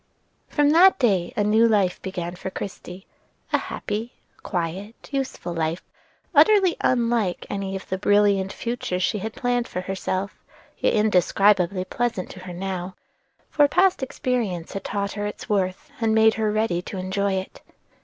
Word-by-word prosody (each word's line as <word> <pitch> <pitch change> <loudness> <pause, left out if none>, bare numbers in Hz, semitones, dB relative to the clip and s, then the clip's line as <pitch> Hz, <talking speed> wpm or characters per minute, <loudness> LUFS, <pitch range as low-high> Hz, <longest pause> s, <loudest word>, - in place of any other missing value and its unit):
From 290 -1 +3
that 365 +4 +6
day 195 -9 +1
a 205 - +3
new 220 +3 +4
life 200 -5 +1
began 180 -2 -5
for 190 - -5
Christie, 185 -1 -8 0.5
a - - +4
happy, 225 +4 -4 0.3
quiet, 185 +4 -4 0.2
useful 265 -10 -3
life, 165 +1 -2 0.5
utterly 400 -5 +5
unlike 235 -6 +1
any 195 -1 -3
of 190 - -7
the 190 - -3
brilliant 205 -1 +3
futures 230 -6 -3
she 210 - 0
had 220 +3 -5
planned 245 -1 0
for 180 - -4
herself; 190 +1 -3 0.4
yet - - +2
indescribably 195 -2 +3
pleasant 235 -3 -2
to 185 - -10
her 185 -1 -8
now, 185 0 -4 0.6
for 290 -1 +5
past 370 +3 +3
experience 235 -9 -2
had 195 - -5
taught 200 -2 -2
her 205 0 -3
its 205 - -7
worth, 195 +7 -1
and 220 -1 +2
made 220 0 +5
her 215 -1 0
ready 215 -5 0
to 190 - -7
enjoy 190 +2 -1
it. 190 0 -5
200 Hz, 155 wpm, -24 LUFS, 185-230 Hz, 0.6 s, that